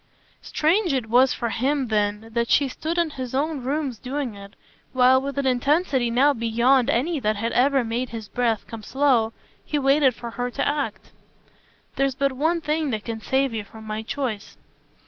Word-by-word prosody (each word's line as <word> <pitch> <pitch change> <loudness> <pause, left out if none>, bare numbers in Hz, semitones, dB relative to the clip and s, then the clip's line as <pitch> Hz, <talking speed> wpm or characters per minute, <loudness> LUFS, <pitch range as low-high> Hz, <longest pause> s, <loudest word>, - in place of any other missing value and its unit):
Strange 340 +2 +1
it 225 -4 -3
was 255 +2 +5
for 235 - -2
him 265 +3 0
then 210 0 -1
that 235 0 0
she 285 - +4
stood 320 +6 -4
in 340 -2 +1
his 260 -3 -5
own 290 -1 -1
rooms 270 -3 -2
doing 265 -2 -3
it, 200 0 -12 0.4
while, 260 0 +5
with 280 +1 -5
an 280 - 0
intensity 265 0 +1
now 270 +5 +4
beyond 235 +2 +2
any 295 +5 +1
that 215 -3 0
had 225 +3 -2
ever 270 +1 +3
made 235 +2 -2
his 225 -2 -7
breath 230 -3 -1
come 225 -1 -8
slow, 250 -2 +2 0.3
he 300 - -2
waited 275 -2 +3
for 235 -1 -7
her 245 +1 -3
act. 285 +1 -2 0.9
"There's 275 -1 +1
but 275 0 +1
one 320 +6 0
thing 305 0 -1
that 215 -4 -3
can 225 -1 -5
save 265 0 0
you 220 -2 -3
from 220 +2 -13
my 215 0 -4
choice." 225 -3 -4
255 Hz, 185 wpm, -23 LUFS, 230-280 Hz, 0.9 s, was